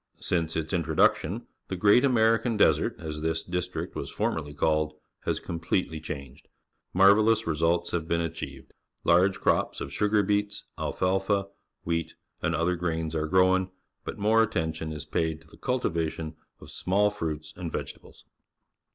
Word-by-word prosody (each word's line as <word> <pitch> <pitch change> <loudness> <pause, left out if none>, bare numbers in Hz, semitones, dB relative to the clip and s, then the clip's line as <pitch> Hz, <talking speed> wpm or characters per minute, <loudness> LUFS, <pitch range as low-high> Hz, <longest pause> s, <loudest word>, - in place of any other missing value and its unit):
Since 80 -2 -1
its 80 +2 -2
introduc 80 -3 +3
tion, 105 +10 -5 0.2
the 95 - -3
"Great 100 +6 +5
American 115 -2 +3
Desert," - - +3
as 75 -3 -6
this 80 0 -1
district 90 0 -4
was - - -4
formerly 75 -2 -2
called, 75 +1 +1 0.3
has - - 0
completely 80 -1 -2
changed. 70 -1 -8 0.4
Marvellous 105 +4 +5
results 85 +1 +1
have 80 -2 -2
been 85 0 +1
achieved. 70 -5 -5 0.3
Large 95 +3 +4
crops - - +1
of 70 - -6
sugar 105 +3 +2
beets, 105 +1 -1
alfalfa, 95 +1 0 0.3
wheat, 85 -1 -2 0.3
and 85 - 0
other 85 +2 +1
grains 80 -2 -2
are 80 -1 -1
grown, 95 +2 +3 0.3
but - - -6
more 110 +2 +4
attention 80 -7 -1
is 75 -1 -6
paid 80 -1 -1
to 80 - -21
the - - -16
cultivation 85 - -2 0.2
of - - -12
small 100 +3 +2
fruits 75 -6 -4
and 90 -3 -5
vegetables. - - -7
85 Hz, 150 wpm, -27 LUFS, 80-100 Hz, 0.4 s, Great